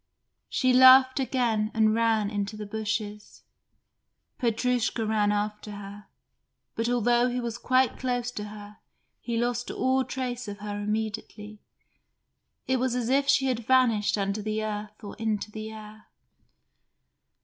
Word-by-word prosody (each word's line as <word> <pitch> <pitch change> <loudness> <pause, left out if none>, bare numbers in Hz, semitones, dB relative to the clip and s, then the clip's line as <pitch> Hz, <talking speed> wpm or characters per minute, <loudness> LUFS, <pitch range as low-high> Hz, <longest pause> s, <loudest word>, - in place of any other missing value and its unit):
She 255 -1 +2
laughed 260 +1 +7
again 235 -5 0
and 215 -1 +3
ran 220 -2 +1
into 205 0 -3
the 210 - -6
bushes. 210 0 -5 1.0
Petrushka 240 -1 0
ran 210 -1 +1
after 210 0 -3
her, 205 0 -10 0.7
but 230 +1 -1
although 240 +1 +2
he 250 0 -2
was 235 -1 -4
quite 255 +1 +2
close 245 -1 -2
to 210 -4 -6
her 210 0 -11 0.4
he 235 -1 -3
lost 240 +1 -1
all 260 0 +1
trace 250 -2 -4
of 200 0 -6
her 205 0 -5
immediately. 215 0 -4 1.1
It 260 -1 +1
was 255 -1 0
as 245 -2 -1
if 275 +1 +2
she 275 -1 +4
had 255 -3 0
vanished 235 -6 +3
under 200 +1 -1
the 215 +1 -2
earth 210 0 -6
or 205 - -8
into 215 -1 -2
the 215 0 -6
air. 215 0 -12
220 Hz, 140 wpm, -27 LUFS, 210-245 Hz, 1.1 s, laughed